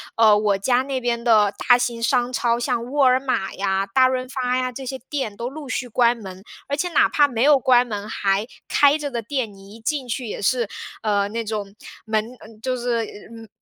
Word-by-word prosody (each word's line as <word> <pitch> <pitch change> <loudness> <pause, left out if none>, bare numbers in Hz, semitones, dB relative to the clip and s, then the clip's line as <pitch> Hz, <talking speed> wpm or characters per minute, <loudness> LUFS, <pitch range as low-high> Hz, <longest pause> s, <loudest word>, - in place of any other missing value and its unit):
呃， 215 -2 +6
我 205 -1 +1
家 245 +6 +2
那 270 -1 -3
边 235 -1 -1
的 215 -4 +4
大 245 - +7
型 240 -1 -2
商 240 +1 +1
超， 235 -1 +1
像 235 -1 -1
沃 285 -1 +3
尔 255 0 +5
玛 255 -8 -2
呀、 195 0 -1
大 255 +6 +4
润 255 0 -2
发 255 -1 -1
呀， 255 0 -1
这 265 +2 -8
些 265 +1 -4
店 260 -9 -3
都 235 +1 -4
陆 285 0 -9
续 255 - -2
关 240 0 +2
门。 190 -3 -10 0.2
而 280 - -1
且 355 +5 -2
哪 335 - +4
怕 290 -1 +4
没 235 -5 -3
有 290 0 +6
关 250 -1 +4
门， 210 -2 -5
还 200 +2 0 0.2
开 290 +1 +4
着 295 -2 -4
的 235 -2 -3
店， 235 -1 -3
你 195 +1 -14
一 - - -13
进 260 +3 -2
去 245 +2 -3
也 - - -5
是， 235 +2 +1 0.4
呃， 205 -2 +1
那 230 +2 -3
种 205 -2 -4 0.3
门 220 -1 0 0.4
就 255 +2 -1
是 240 -1 -1 0.3
嗯， 225 -1 -11
240 Hz, 235 characters per minute, -22 LUFS, 215-255 Hz, 0.4 s, 大